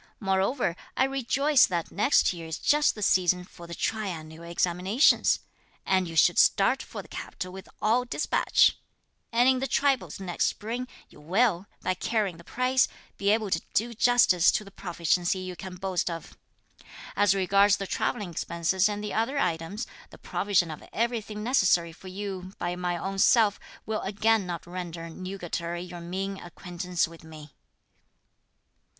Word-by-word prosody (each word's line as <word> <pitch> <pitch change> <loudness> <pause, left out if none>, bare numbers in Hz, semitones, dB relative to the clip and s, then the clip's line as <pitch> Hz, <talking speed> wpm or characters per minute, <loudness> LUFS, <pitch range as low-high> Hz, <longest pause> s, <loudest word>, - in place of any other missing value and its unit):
Moreover, 195 0 0 0.2
I - - +4
rejoice 270 +1 +3
that 170 -2 -3
next 210 +1 +3
year 165 -2 -8
is 160 - -4
just 295 0 +3
the 210 - -5
season 180 -2 +3
for 175 -1 -13
the 170 - -7
triennial 170 -7 -4
examinations, 180 - +3 0.5
and 185 -1 +2
you 165 - -7
should 160 - +5
start - - +4
for - - -8
the - - -16
capital 185 0 -7
with 190 0 -10
all 230 +4 +3
despatch; 250 - +2 0.5
and 240 +2 +4
in 260 -1 +4
the 270 - -1
tripos 265 - +1
next 180 -3 -1
spring, 240 +4 -3 0.2
you - - -17
will, 190 +3 +1 0.2
by 185 - +1
carrying 195 -1 -1
the 170 - -14
prize, 255 +5 +2 0.3
be 200 - +1
able 215 -1 +1
to - - +1
do 235 +3 +1
justice 230 -6 +4
to - - 0
the 200 - -13
proficiency 175 -1 0
you 185 -1 -6
can 185 0 -8
boast 185 -1 -1
of. 165 -1 -7 0.8
As 205 -1 +4
regards 195 +1 +4
the 195 - -4
travelling 205 -1 -2
expenses 170 +4 0
and 205 0 -4
the 210 - -4
other 230 +6 0
items, 170 -1 -1 0.2
the - - -14
provision 185 -5 0
of 155 - -8
everything 220 -2 -2
necessary 190 -8 +3
for 175 +3 -14
you 190 -1 -6
by 175 0 -2
my 180 -1 -2
own 195 +3 -4
self 210 -1 +4 0.3
will 220 0 -2
again 210 0 +1
not 170 -2 -5
render 175 -2 -6
nugatory 175 -1 -5
your 175 -1 -9
mean 190 +3 -4
acquaintance 175 0 -3
with 165 0 -14
me." 155 -2 -12
190 Hz, 160 wpm, -27 LUFS, 175-215 Hz, 0.8 s, should